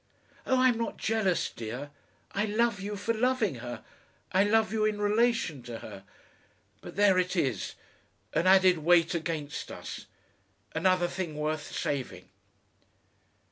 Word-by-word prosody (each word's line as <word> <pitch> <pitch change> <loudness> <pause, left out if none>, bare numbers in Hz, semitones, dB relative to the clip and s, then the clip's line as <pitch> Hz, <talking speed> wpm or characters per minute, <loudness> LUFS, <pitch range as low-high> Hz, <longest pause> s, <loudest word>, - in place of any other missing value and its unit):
Oh, 260 - +3
I'm 255 -3 +4
not 230 - -3
jealous, 215 -6 0
dear. 120 +6 -6 0.4
I 200 +2 0
love 220 0 +1
you 205 +1 -4
for 205 +3 -1
loving 230 - +1
her. 120 -2 -7 0.5
I 190 +2 +4
love 220 +1 +2
you 220 -1 +1
in 215 -1 +1
relation 210 - +1
to 120 -1 -7
her. 100 -3 -10 0.8
But - - -10
there 200 -2 +5
it 180 +1 0
is, 130 - -1 0.6
an 170 - +2
added 185 -2 +6
weight 170 +1 +4
against 160 -3 -4
us, - - -8 0.7
another 180 +2 +2
thing 175 -4 -4
worth 150 0 -2
saving." 140 -3 -3
185 Hz, 140 wpm, -29 LUFS, 150-215 Hz, 0.8 s, added